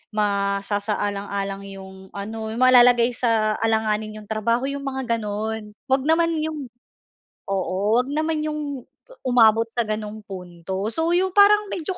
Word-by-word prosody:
masasaalang-alang 200 -1 -1
yung 190 -1 -11
ano 220 +2 -5
yung 230 +3 -4
malalagay 245 -1 +6
sa 220 -3 +1
alanganin 220 -1 0
'yong 210 - -17
trabaho, 230 +3 0
yung 280 0 -5
mga 260 -3 -1
ganun. 210 0 -4 0.2
Huwag 265 0 +2
naman 335 +1 +3
'yong 305 -3 -4 0.8
oo, 190 -1 -1 0.2
huwag 250 +2 0
naman 310 +1 -1
'yong 300 -3 -4 0.3
u - - -13 0.2
umabot 225 -1 +5
sa 240 - 0
gano'ng 215 0 -4
punto. 185 0 -6
So, 325 +1 0
'yong 370 +1 +1
parang 415 +1 +6
medyo 360 +2 -4
220 Hz, 140 wpm, -23 LUFS, 205-265 Hz, 0.8 s, malalagay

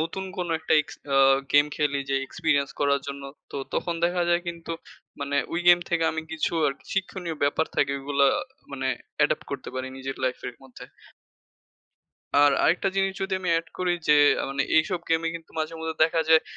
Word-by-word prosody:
নতুন 165 +4 -3
কোন 180 -1 -2
একটা 160 0 -2
এক্স 150 - -9 0.2
আ - - +4 0.4
গেম 145 0 +6
খেলি 145 -2 0
যে - - +2
এক্সপেরিয়েন্স 145 -3 0
করার 140 -1 +2
জন্য। 140 0 -6 0.3
তো - - -6 0.2
তখন 170 - -1
দেখা 175 0 +1
যায় 175 0 +3
কিন্তু 170 -1 -5 0.5
মানে 140 0 -1 0.2
ওই 165 - 0
গেম 175 0 +8
থেকে 170 -1 +2
আমি 160 0 -3
কিছু 160 +1 -1
আরকি 140 - -4
শিক্ষণীয় 185 -4 -3
ব্যাপার 145 +3 +2
থাকে 140 -1 +2
ঐগুলো 140 0 +1 0.5
মানে 135 -1 -3 0.3
অ্যাডাপ্ট - - +2
করতে - - -5
পারি 130 0 -3
নিজের 135 0 -5
লাইফ 125 - -1
এর 125 - -9
মধ্যে। 130 -2 -12 1.5
আর, 145 0 +7
আরেকটা 180 +4 +3
জিনিস 195 0 +2
যদি 195 - -3
আমি 180 - -3
এড 165 - -8
করি 180 -1 +1
যে, 150 - +7 0.2
আ - - -1
মানে 140 0 0
এইসব 175 +3 +2
গেম 160 - +3
এ - - +2
কিন্তু 165 - -15
মাঝে 155 +1 -2
মধ্যে 160 0 -3
দেখা 165 +1 +1
যায় 160 0 +6
160 Hz, 190 wpm, -26 LUFS, 140-170 Hz, 1.5 s, গেম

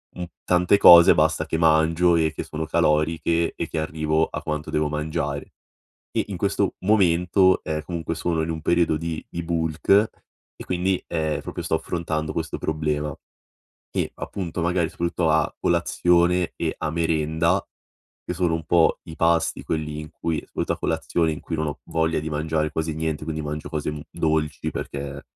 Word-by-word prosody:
mhmm, 90 - -4 0.2
tante 90 +2 +3
cose 85 -3 +9
basta 80 0 +2
che 80 - -1
mangio 80 +2 +4
e 80 -1 +2
che - - -4
sono 80 +1 -5
caloriche 80 +2 +1
e - - -3
che 80 - -2
arrivo 80 0 0
a - - -6
quanto 75 0 -3
devo 75 0 +1
mangiare. 75 -1 -3 0.6
E - - 0
in 100 - -4
questo 100 +1 0
momento, 95 -1 +3
ehm, 75 0 -3
comunque 85 -1 -4
sono 85 -1 0
in 80 - -3
un 80 -1 -3
periodo 85 -1 +2
di 80 0 -4
di 85 - -4
bulk 80 -2 -3 0.7
e - - -9
quindi, 90 +1 0
uhm, 80 -3 -1
proprio - - -6
sto - - -1
affrontando 80 -2 -3
questo 80 0 -3
problema. 75 -2 -2 0.8
E - - -1
appunto, 90 -3 -5
magari 85 -1 +1
soprattutto 85 -1 -1
a 80 0 +2
colazione 85 +1 +2
e - - -2
a 80 - -2
merenda, 80 0 +1 0.6
che 90 - -4
sono 85 -2 +1
un 80 -1 -3
po' 85 +1 +3
i 80 - -8
pasti 85 +1 +1
quelli 75 -1 -3
in 75 -1 -9
cui, 80 -2 -2
soprattutto - - -2
a - - -14
colazione, 80 0 0
in 75 - -6
cui 80 - -4
non 80 0 -1
ho 75 - -5
voglia 80 -1 +1
di 80 +1 -5
mangiare 75 +1 -1
quasi 80 0 -2
niente, 80 -1 -3
quindi 80 0 -3
mangio 75 0 -5
cose 75 -1 -4
dolci 80 -3 -1
perché, 70 0 -5
80 Hz, 175 wpm, -24 LUFS, 75-85 Hz, 0.8 s, cose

